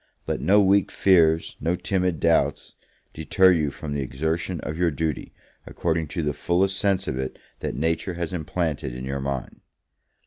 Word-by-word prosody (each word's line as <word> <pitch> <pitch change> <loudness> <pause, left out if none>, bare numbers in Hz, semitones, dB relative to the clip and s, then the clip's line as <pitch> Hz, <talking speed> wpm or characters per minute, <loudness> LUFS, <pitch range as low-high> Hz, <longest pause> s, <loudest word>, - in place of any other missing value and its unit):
let - - -2
no 100 +2 +5
weak 100 +1 +3
fears, 80 -4 +3
no 85 +4 +1
timid 90 -3 -1
doubts, 85 0 +1 0.4
deter 95 +4 +4
you 80 -5 +2
from 70 +1 -6
the 70 - -1
exertion 80 +6 -2
of 75 - -4
your 85 +1 +2
duty, 80 -2 -3 0.4
according 80 -2 -1
to 85 +3 -3
the 75 -1 0
fullest 95 +6 +1
sense 100 -2 +1
of 65 - -2
it 65 0 -4 0.2
that - - -4
Nature 80 +4 -1
has 85 0 -4
implanted 80 -5 -2
in 65 +1 -6
your 70 +1 -3
mind. 70 -1 -4
80 Hz, 170 wpm, -24 LUFS, 75-90 Hz, 0.4 s, no